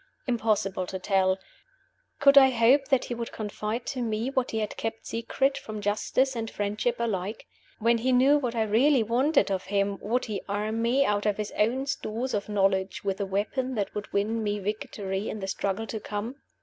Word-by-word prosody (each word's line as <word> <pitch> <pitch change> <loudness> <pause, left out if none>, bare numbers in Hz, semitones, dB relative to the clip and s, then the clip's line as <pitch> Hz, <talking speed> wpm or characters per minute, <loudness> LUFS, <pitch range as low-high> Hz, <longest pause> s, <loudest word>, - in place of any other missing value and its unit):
Impossible 210 -6 0
to 190 - -4
tell! 190 0 +2 0.8
Could 280 0 +6
I 270 -1 +9
hope 255 +3 +4
that 270 -3 +2
he - - -4
would 235 -1 -5
confide 215 +2 -4
to 260 -2 -3
Me 225 +2 -1
what 260 -2 0
he 220 - -3
had 215 -1 -2
kept 225 0 -4
secret 265 +4 0
from 215 -1 -7
Justice 215 +6 0
and 225 -1 -3
Friendship 210 +4 -1
alike? 210 -3 -3 0.3
When 230 +1 +2
he 255 +3 +1
knew 265 +4 +5
what 245 -4 -2
I 225 - +2
really 240 +5 +4
wanted 250 +2 +2
of 190 -1 -1
him, 200 0 0
would 245 +4 0
he 210 -3 -4
arm 215 +3 -1
me, 255 +4 +3
out 210 -1 +1
of 205 - +1
his 210 -1 -3
own 245 +6 +1
stores 255 -2 -3
of 205 0 -2
knowledge, 195 -2 +1
with 195 -1 -1
the 200 - -2
weapon 250 +7 -1
that 205 -3 -2
would 205 0 -6
win 220 +3 0
me 205 -1 -1
victory 200 -1 -3
in 215 - -5
the 195 - -4
struggle 195 +2 -2
to 220 0 -5
come? 210 +6 -5
220 Hz, 200 wpm, -27 LUFS, 205-245 Hz, 0.8 s, I